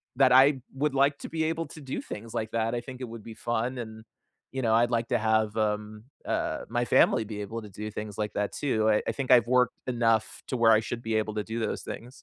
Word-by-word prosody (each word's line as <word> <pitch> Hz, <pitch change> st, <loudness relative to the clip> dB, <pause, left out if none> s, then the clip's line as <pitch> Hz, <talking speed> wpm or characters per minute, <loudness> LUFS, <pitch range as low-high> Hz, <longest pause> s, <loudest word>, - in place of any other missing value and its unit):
that 130 Hz, -1 st, +5 dB
I 135 Hz, +1 st, +6 dB
would 140 Hz, +1 st, -1 dB
like 140 Hz, +1 st, +3 dB
to -, -, -7 dB
be 160 Hz, -1 st, -1 dB
able 165 Hz, -1 st, -2 dB
to 155 Hz, -, -11 dB
do 135 Hz, -1 st, -4 dB
things 110 Hz, +2 st, -8 dB
like 110 Hz, -1 st, -2 dB
that. 115 Hz, +1 st, 0 dB
I 120 Hz, -, -2 dB
think 130 Hz, +1 st, -9 dB
it 125 Hz, -, -5 dB
would 115 Hz, -2 st, -9 dB
be 110 Hz, -1 st, -9 dB
fun, 120 Hz, +2 st, -2 dB
and, 110 Hz, -2 st, -7 dB, 0.5 s
you 135 Hz, 0 st, -3 dB
know, 110 Hz, -1 st, +3 dB
I'd 120 Hz, +1 st, +4 dB
like 115 Hz, 0 st, 0 dB
to -, -, +2 dB
have, 110 Hz, -1 st, +1 dB
um, 105 Hz, 0 st, -2 dB, 0.2 s
uh, -, -, -1 dB
my 120 Hz, +1 st, 0 dB
family 115 Hz, -, +4 dB
be 105 Hz, -1 st, -6 dB
able 115 Hz, +3 st, -5 dB
to 105 Hz, -, -10 dB
do 105 Hz, +3 st, -6 dB
things 105 Hz, -1 st, -6 dB
like 105 Hz, -1 st, -2 dB
that, 105 Hz, 0 st, -2 dB
too. 110 Hz, -6 st, +1 dB
I 105 Hz, -, +3 dB
I -, -, +2 dB
think 135 Hz, -2 st, -4 dB
I've 120 Hz, -2 st, +7 dB
worked 125 Hz, 0 st, +3 dB
enough 115 Hz, -3 st, +1 dB
to 130 Hz, -, -2 dB
where 115 Hz, -1 st, +5 dB
I 110 Hz, -, +6 dB
should 115 Hz, +2 st, -5 dB
be 115 Hz, 0 st, -2 dB
able 110 Hz, 0 st, -1 dB
to 105 Hz, -, -1 dB
do 115 Hz, +2 st, -4 dB
those 110 Hz, -, -2 dB
things. 120 Hz, -, -7 dB
115 Hz, 260 wpm, -28 LUFS, 110-125 Hz, 0.5 s, I've